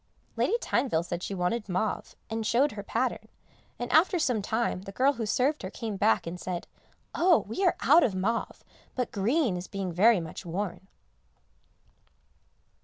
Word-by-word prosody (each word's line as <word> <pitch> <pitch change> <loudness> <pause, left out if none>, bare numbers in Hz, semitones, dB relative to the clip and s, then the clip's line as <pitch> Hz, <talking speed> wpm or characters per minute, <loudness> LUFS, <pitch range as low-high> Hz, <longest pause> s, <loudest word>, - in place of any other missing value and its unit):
Lady 465 - +1
Tyneville 240 - 0
said 175 0 -4
she 195 - -4
wanted 195 +4 -1
mauve, 185 +3 -2
and 225 0 -3
showed 255 +6 +2
her 205 - -6
pattern, 200 - -2 0.5
and 245 0 -4
after 355 +4 +4
some 250 -9 +1
time 220 -2 -1
the 195 - -9
girl 265 +7 +3
who 230 -4 -4
served 270 +8 +1
her 185 - -5
came 220 +1 -5
back 110 - +2
and 170 +2 -6
said, 180 -2 -4 0.5
"Oh! 345 -1 +4
we 300 - -3
are 360 - +4
out 315 +6 +6
of 200 - +1
mauve, 220 +5 -2 0.3
but 250 -2 -2
green 225 - +1
is 180 +1 -5
being 195 -3 -4
very 210 +4 +5
much 165 -2 -7
worn." 180 +1 -4
215 Hz, 170 wpm, -28 LUFS, 185-255 Hz, 0.5 s, out